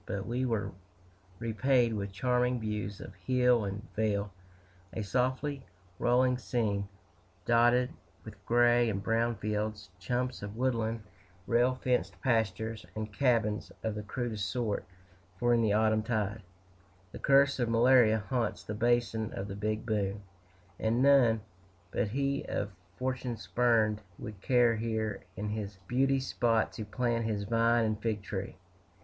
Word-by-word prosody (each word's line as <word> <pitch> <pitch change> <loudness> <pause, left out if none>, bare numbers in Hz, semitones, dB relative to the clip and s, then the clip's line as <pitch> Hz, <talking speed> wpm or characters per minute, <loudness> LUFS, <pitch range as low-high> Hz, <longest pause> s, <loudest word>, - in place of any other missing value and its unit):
But 100 +1 -3
we 125 +2 -1
were 105 -4 -1 0.7
repaid 120 +2 +2
with 100 -2 -3
charming 125 +4 +1
views 105 -2 -4
of - - -9
hill 125 +2 +2
and 100 +4 -5
vale, 105 -2 0 0.6
a 110 - -3
softly 130 +5 -1 0.4
rolling 125 +1 +3
scene 105 -6 -1 0.6
dotted 120 +1 +4 0.4
with - - -8
little - - -23
gray 120 0 +4
and 100 -2 -3
brown 115 +2 +1
fields, 105 -1 -3
clumps 125 +1 -1
of 100 +1 -6
woodland, 115 -3 -1 0.4
rail 120 +3 +3
fenced 125 -1 -1
pastures, 110 -2 0
and 110 -1 -5
cabins 115 -5 +1
of 110 - -1
the 105 - -4
crudest 105 -3 -3
sort 110 0 -2 0.5
for 120 +3 +2
in 120 - +3
the 110 -2 +2
autumn 110 0 +3
tide, 110 -1 -2 0.7
the - - -8
curse 140 0 +4
of 120 -2 +1
malaria 115 -2 +5
haunts 120 -5 -1
the 105 - -5
basin 115 -1 +1
of 95 - -4
the 95 - -6
Big 105 +2 -2
Bone, 105 -2 -1 0.6
and 115 +3 +1
none 125 -6 +5 0.5
but - - 0
he 140 +5 -1
of 100 0 -3 0.3
fortune 125 -2 -2
spurned 110 -4 +2 0.2
would 105 -5 -8
care 120 -2 +3
here 110 -1 -2 0.2
in 105 +1 -3
this 105 -2 -5
beauty 135 +3 +2
spot 115 -3 +1
to 110 - -5
plant 115 +1 -1
his 105 -2 -1
vine 115 +2 +3
and 110 0 -2
fig 105 -3 -2
tree. - - -5
115 Hz, 145 wpm, -31 LUFS, 105-125 Hz, 0.7 s, malaria